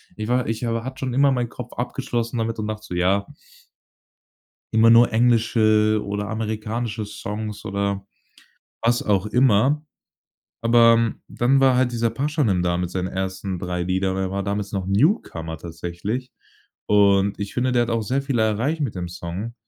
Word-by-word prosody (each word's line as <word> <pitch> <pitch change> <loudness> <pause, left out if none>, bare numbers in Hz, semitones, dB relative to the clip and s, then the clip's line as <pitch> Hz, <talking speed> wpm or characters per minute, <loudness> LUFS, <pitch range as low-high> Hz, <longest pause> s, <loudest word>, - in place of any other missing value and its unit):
Ich 110 0 -5
war 125 0 +1
ich 115 +2 -2
aber 115 0 -1
hatte 130 +1 -7
schon 130 -2 -3
immer 140 +2 +4
meinen 125 -2 -1
Kopf - - -9
abgeschlossen 120 0 -3
damit 115 0 -2
und 105 - -2
dachte 110 0 -5
so: - - -7
„Ja“ 95 +3 +2 1.5
„immer 110 +1 +6
nur 115 0 +6
englische 110 -2 +3
oder 100 0 -3
amerikanische 110 0 -3
Songs“ 105 +1 -6
oder 100 -1 -2 0.8
was 120 +1 +2
auch 100 -2 +1
immer. 130 +6 +3 0.8
Aber 115 -1 +4
dann 135 +3 +2
war 130 -2 +4
halt 125 -1 +2
dieser 115 -1 0
Pashanim 135 - 0
da 85 0 +1
mit 90 0 -2
seinen 90 0 -2
ersten 95 0 -4
3 90 0 -3
Lieder, 95 +1 0
er 95 -1 -1
war 100 +1 -2
damals 100 +1 -3
noch 95 -2 -2
Newcomer 95 - 0
tatsächlich. 85 +10 -5 0.6
Und 100 -1 +3
ich 100 0 -5
finde, 125 +1 +1
der 120 -1 +3
hat 120 - -2
auch 115 -1 0
sehr 130 +6 0
viel 135 -3 -2
erreicht 115 +9 0
mit 130 -7 -2
dem 90 -2 -4
Song. 90 +6 -6
110 Hz, 170 wpm, -22 LUFS, 100-120 Hz, 1.5 s, immer